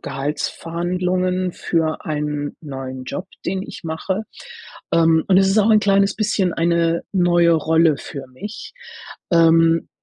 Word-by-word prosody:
Gehaltsverhandlungen 180 +6 -2
für 160 -2 -2
einen 150 -1 -3
neuen 130 -3 -7
Job, 185 +8 -5 0.2
den 190 0 -2
ich - - -10
mache. 165 +6 -3 0.7
Ähm, 165 -1 +3
und 185 - +5
es 190 0 +4
ist 195 +3 +2
auch 215 +2 +4
'n 215 - +6
kleines 200 -1 +2
bisschen 205 -4 0
eine 170 0 +1
neue 175 -2 +3
Rolle 160 -1 +3
für 135 -2 -8
mich, 210 - -9 0.6
ähm, 165 -1 +4
170 Hz, 130 wpm, -20 LUFS, 160-185 Hz, 0.7 s, n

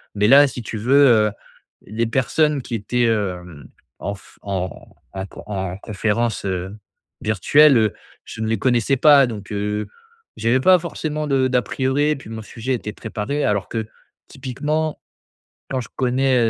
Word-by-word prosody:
Mais 105 +1 +2
là, 140 +3 +8
si 125 -2 -5
tu 115 - -7
veux, 140 +6 +5
heu, 110 -4 +4 0.5
les 115 +3 -2
personnes 140 +4 +1
qui 120 - -5
étaient, 120 +3 0
hem, 90 -9 -2 0.3
en 100 - -3
f 95 - -19
en 95 -2 -2 0.5
à 95 0 -4
q - - -16
en 95 -3 -4
conférence, 110 +2 -1
heu, 95 +1 -3 0.5
virtuelle, 130 +7 +5
heu, 110 -2 +2 0.3
je 115 - -8
ne 110 - -1
les 110 0 0
connaissais 125 +2 +2
pas, 140 -1 +6
donc, 105 -2 -7
heu, 105 +1 -2 0.5
j'avais 120 +3 +2
pas 185 +6 +6
forcément 155 -3 -4
de 135 -3 +2
d'a 125 -1 +2
priori, 140 +6 0
puis 135 - -12
mon 110 0 -6
sujet 115 +4 -4
était 110 -3 -3
préparé 115 +6 -3
alors 100 -2 0
que 110 -2 -3 0.4
typiquement, 150 +4 -3 0.7
quand 130 -1 -1
je - - -8
connais, 130 +1 +2
115 Hz, 165 wpm, -21 LUFS, 105-135 Hz, 0.7 s, là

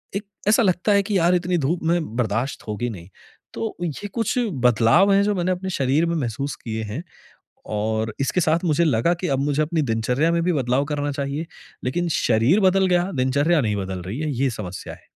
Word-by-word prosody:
एक 205 - -3 0.2
ऐसा 220 +2 +5
लगता 185 +1 +1
है 200 0 +4
कि 200 -1 0
यार 175 +2 +3
इतनी 180 0 0
धूप 160 +5 -1
में 165 -8 0
बर्दाश्त 115 +2 -2
होगी 120 +3 -2
नहीं। 90 -3 -10 0.4
तो 225 -1 -4
ये 175 +5 -4
कुछ 230 +1 -1 0.3
बदलाव 125 - +4
है 200 0 +4
जो 205 0 +1
मैंने 180 0 0
अपने 190 +1 -5
शरीर 140 +5 +2
में 170 - -1
महसूस 135 0 -3
किए 110 -1 -3
हैं। 110 +11 -5 0.7
और 110 +1 -1
इसके 140 +6 +1
साथ 160 +2 +2
मुझे 165 +1 +3
लगा 140 +3 +2
कि 180 - -2
अब 135 - +1
मुझे 145 +1 +1
अपनी 160 +1 0
दिनचर्या 125 +8 +1
में 170 0 +1
भी 180 - +2
बदलाव 130 -1 +1
करना 145 -1 -2
चाहिए। 140 +3 -3 0.4
लेकिन 175 +7 -1
शरीर 120 - +3
बदल 190 0 +4
गया, 180 +1 +2
दिनचर्या 140 +5 +2
नहीं 105 -5 0
बदल 95 -2 -4
रही 100 +9 -5
है। 155 -1 -1
ये 135 - +2
समस्या 95 -5 -7
है। - - -22
145 Hz, 205 wpm, -22 LUFS, 120-175 Hz, 0.7 s, ऐसा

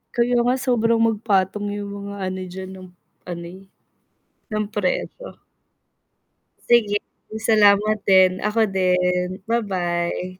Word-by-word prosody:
Kaya 245 +1 +2
nga, 250 +2 +2
sobrang 230 -3 +1
magpatong 205 -2 0
yung 200 -1 -6 0.2
mga 200 - -6
ano 185 0 -4
diyan 190 0 -7
ng 185 -1 -11 0.4
ano 170 -1 -6
eh, 190 - -14 0.9
ng 215 0 -1
presyo. 210 - -4 1.2
Sige, 215 -4 +3 0.4
salamat 215 -1 +4
din, 185 -1 +5
ako 220 +1 +2
din, 180 -2 +1 0.2
ba-bye, 185 -4 -2
200 Hz, 110 wpm, -22 LUFS, 185-220 Hz, 1.2 s, din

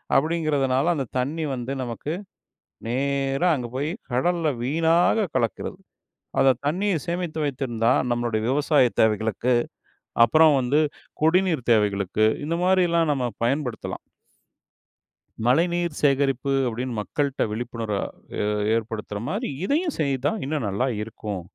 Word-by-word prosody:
அப்படிங்கிறதுனால, 145 -3 +1
அந்த 135 -3 -2
தண்ணி 145 +6 -1
வந்து 125 0 -4
நமக்கு 125 +5 -4 0.7
நேரா 135 +5 0
அங்கே 125 -4 -5
போய் 145 +3 -1 0.2
கடல்ல 165 +6 +1
வீணாக 165 - +2
கலக்கிறது. 115 -4 -1 0.6
அதை 135 - +6
தண்ணியை 185 +5 +1
சேமித்து 170 -2 -2
வைத்திருந்தா 125 -5 0 0.2
நம்மளுடைய 120 -2 0
விவசாய 140 -1 +3
தேவைகளுக்கு, 110 +3 +1 0.7
அப்புறம் 155 +5 +5
வந்து 135 +4 +2 0.4
குடிநீர் 165 -5 +2
தேவைகளுக்கு 105 -1 +2 0.2
இந்த 165 +2 -1
மாதிரிலாம் 175 -3 +3
நம்ம 130 -3 -1 0.2
பயன்படுத்தலாம். 125 -1 -2 1.5
மழைநீர் 170 +4 +1
சேகரிப்பு 140 -2 +2 0.2
அப்டின்னு 120 0 -4
மக்கள்கிட்ட 140 +5 -1
விழிப்புணர்வ 115 -2 -3 0.8
ஏற்படுத்துற 110 -2 -3
மாதிரி 215 +6 -2 0.2
இதையும் 315 - 0
செய்தா, 140 -1 0
இன்னும் 145 -5 -2
நல்லா 105 +7 0
இருக்கும். 105 -3 -5
135 Hz, 105 wpm, -24 LUFS, 120-160 Hz, 1.5 s, அதை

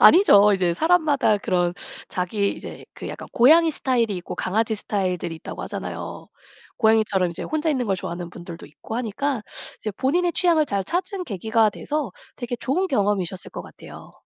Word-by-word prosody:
아니죠. 210 - +7
이제 180 -3 +2
사람마다 300 - +3
그런 175 -3 0 0.3
자기 200 +3 -1
이제 - - -9
그 - - -7
약간 - - -8
고양이 320 +7 +6
스타일이 240 -8 0
있고 175 - -6
강아지 220 +4 0
스타일들이 185 -5 -2
있다고 - - -7
하잖아요. - - -6 0.5
고양이처럼 215 -5 +3
이제 170 - -6
혼자 310 +1 -1
있는 255 -5 0
걸 195 - +1
좋아하는 175 -2 -5
분들도 170 -1 -9
있고 220 +9 -8
하니까 245 +2 -2 0.4
이제 215 - -3
본인의 340 - +1
취향을 335 -3 +3
잘 200 -5 0
찾은 365 - -2
계기가 220 - +1
돼서 290 +1 -3 0.3
되게 245 -1 -4
좋은 345 +11 0
경험이셨을 200 - -1
것 - - -6
같아요. - - -13
220 Hz, 400 characters per minute, -23 LUFS, 190-290 Hz, 0.5 s, 아니죠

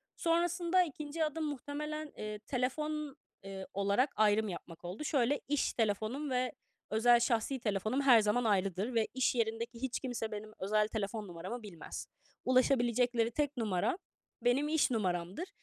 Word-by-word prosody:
Sonrasında 345 +2 +2
2. 305 0 -3
adım 310 +1 -3
muhtemelen, 300 +2 -4
eee, 215 0 -5
telefon, 280 +5 -2 0.3
eee, 195 -1 -7
olarak 200 +7 +2
ayrım 215 0 +3
yapmak 170 -1 -8
oldu. 185 +11 -5
Şöyle, 285 -2 +1
iş 290 0 +1
telefonum 225 +6 -1
ve 255 -1 0 0.4
özel 235 +3 +5
şahsi 240 +2 +1
telefonum 215 +3 0
her 250 -5 +7
zaman 215 +4 +2
ayrıdır 200 +2 +1
ve 225 -2 +2
iş 260 0 +2
yerindeki 230 +1 -2
hiç 265 -1 -1
kimse 240 -4 -3
benim 215 +1 -6
özel 210 +2 +2
telefon 215 -1 -3
numaramı 185 +7 -6
bilmez. 190 -6 -7 0.4
Ulaşabilecekleri 245 -2 +3
tek 290 +1 -1
numara 210 - 0 0.5
benim 255 +5 +3
iş 310 -4 +3
numaramdır 190 - -1
240 Hz, 140 wpm, -33 LUFS, 210-280 Hz, 0.5 s, her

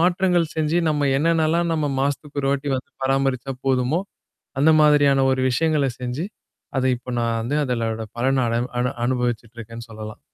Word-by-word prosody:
மாற்றங்கள் 175 -1 +2
செஞ்சு 155 +2 +1
நம்ம 145 -2 +1
என்னான்னலாம் 165 +2 +2
நம்ம 155 -2 0
மாசத்துக்கு 145 +1 -2
ஒரு 135 - +1
வாட்டி 140 +1 -1
வந்து 130 - -8
பராமரிச்சா 135 0 0
போதுமோ, 130 +5 +2 0.6
அந்த 160 +2 +6
மாதிரியான 145 -3 +5
ஒரு 130 - 0
விஷயங்கள 150 +2 +1
செஞ்சு, 125 +8 -3 0.5
அது 130 - +1
இப்ப 125 +1 -9
நான் 115 -1 0
வந்து 140 +6 -1
அதனோட 115 -3 -2
பலன 130 +1 +2
அட 115 - -1 0.3
அனு 125 +1 +1 0.2
அனுபவிச்சுட்டு 120 -2 -2
இருக்கேன்னு 115 +1 -9
சொல்லலாம். 110 -1 -8
135 Hz, 155 wpm, -22 LUFS, 125-150 Hz, 0.6 s, அந்த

